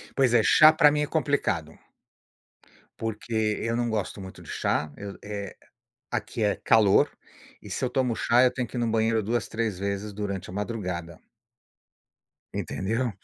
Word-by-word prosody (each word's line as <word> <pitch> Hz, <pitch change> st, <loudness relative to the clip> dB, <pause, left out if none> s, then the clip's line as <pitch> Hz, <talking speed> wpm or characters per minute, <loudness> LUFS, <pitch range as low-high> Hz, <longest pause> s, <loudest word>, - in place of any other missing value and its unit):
Pois 130 Hz, -3 st, +3 dB
é, 120 Hz, -, +6 dB
chá 155 Hz, +8 st, +8 dB
para 150 Hz, -2 st, +6 dB
mim 150 Hz, 0 st, 0 dB
é 150 Hz, -, 0 dB
complicado, 140 Hz, -, -1 dB, 1.2 s
porque 110 Hz, -1 st, -2 dB
eu 115 Hz, 0 st, -1 dB
não 120 Hz, 0 st, 0 dB
gosto 105 Hz, -2 st, -3 dB
muito 95 Hz, 0 st, -10 dB
de -, -, -13 dB
chá, 75 Hz, 0 st, -1 dB
eu 100 Hz, -1 st, -7 dB
eh, 100 Hz, -2 st, -6 dB, 0.6 s
aqui 115 Hz, -, -3 dB
é 105 Hz, -1 st, +2 dB
calor 105 Hz, -3 st, +4 dB, 0.5 s
e -, -, -12 dB
se -, -, -2 dB
eu 125 Hz, -, -1 dB
tomo 125 Hz, -2 st, +1 dB
chá, 120 Hz, +1 st, +3 dB
eu 125 Hz, -, +5 dB
tenho 125 Hz, -1 st, -2 dB
que -, -, -8 dB
ir -, -, -1 dB
no 120 Hz, -, +1 dB
banheiro 110 Hz, 0 st, +2 dB
2, 115 Hz, +2 st, -1 dB
3 110 Hz, -4 st, -2 dB
vezes 100 Hz, +1 st, -3 dB
durante 100 Hz, -2 st, -4 dB
a -, -, -10 dB
madrugada. 90 Hz, -5 st, -4 dB, 1.4 s
Entendeu? 115 Hz, +5 st, -2 dB
110 Hz, 170 wpm, -26 LUFS, 100-120 Hz, 1.4 s, chá